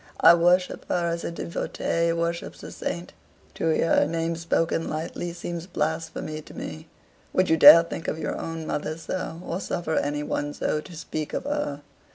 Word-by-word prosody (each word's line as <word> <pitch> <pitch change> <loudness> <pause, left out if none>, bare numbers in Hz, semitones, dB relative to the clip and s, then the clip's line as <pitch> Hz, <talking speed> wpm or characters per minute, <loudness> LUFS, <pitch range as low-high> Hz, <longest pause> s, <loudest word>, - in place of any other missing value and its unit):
I - - +9
worship 175 +2 +2
her 175 -1 +1
as 170 0 -3
a - - -2
devotee 170 0 -1
worships 170 0 -3
a - - -7
saint. 175 +1 -5 0.4
To 165 - -1
hear 160 +1 +3
her - - +4
name 165 +1 -1
spoken 165 0 0
lightly 165 +2 -4
seems 170 0 -6
blasphemy 160 -2 -3
to - - -14
me. 155 +1 -7 0.5
Would 185 -2 +2
you 160 - +5
dare 165 +2 +11
think 165 0 -6
of - - -1
your 160 - -3
own 165 -1 -5
mother 155 +1 -3
so, 165 0 -4
or 170 - -3
suffer 175 -4 -2
any 145 +1 0
one 145 0 -2
so 150 - -1
to 175 +2 -12
speak 155 -1 -5
of - - -2
her? 285 - -2
165 Hz, 185 wpm, -25 LUFS, 155-170 Hz, 0.5 s, dare